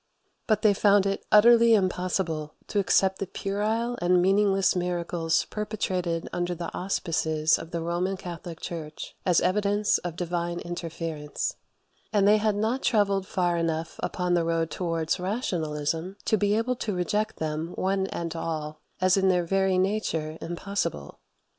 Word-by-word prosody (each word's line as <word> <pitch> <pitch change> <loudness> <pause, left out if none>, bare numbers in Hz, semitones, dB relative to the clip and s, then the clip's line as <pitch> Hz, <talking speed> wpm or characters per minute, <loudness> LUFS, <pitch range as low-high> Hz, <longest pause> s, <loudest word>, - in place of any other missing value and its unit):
But 215 -2 +2
they 210 -2 +6
found 200 0 +4
it 195 0 -1
utterly 230 +1 +7
impossible 180 -5 -1
to 205 - +1
accept 190 0 +2
the 195 - -3
puerile 220 +6 -2
and 180 +1 +4
meaningless 195 +1 +3
miracles 175 -2 0
perpetrated 185 -5 -2
under 175 0 -1
the 170 0 -6
auspices 160 -4 0
of 165 - -8
the 170 -1 -3
Roman 175 +3 -1
Catholic 175 -2 -8
Church 155 -3 -7
as 180 -2 +4
evidence 205 +3 +2
of 175 -2 -5
divine 175 0 -2
interference; 165 - -4 0.6
and 205 -2 +3
they 210 +1 +6
had 215 -1 +1
not 225 +6 0
travelled 200 -4 +2
far 175 -2 0
enough 165 0 -2
upon 180 -1 -1
the 170 -1 +3
road 165 -1 0
towards 165 -1 -1
rationalism 175 - -2
to - - +3
be 205 0 +2
able 250 +3 0
to 210 -5 -3
reject 210 +4 -1
them, 160 +2 -3
one 190 0 0
and 170 -3 -4
all, 155 -2 -4 0.2
as 185 +1 +3
in 190 0 +3
their 180 -2 +2
very 190 +1 +2
nature 185 -5 -1
impossible. 170 - -4
180 Hz, 150 wpm, -27 LUFS, 165-200 Hz, 0.6 s, utterly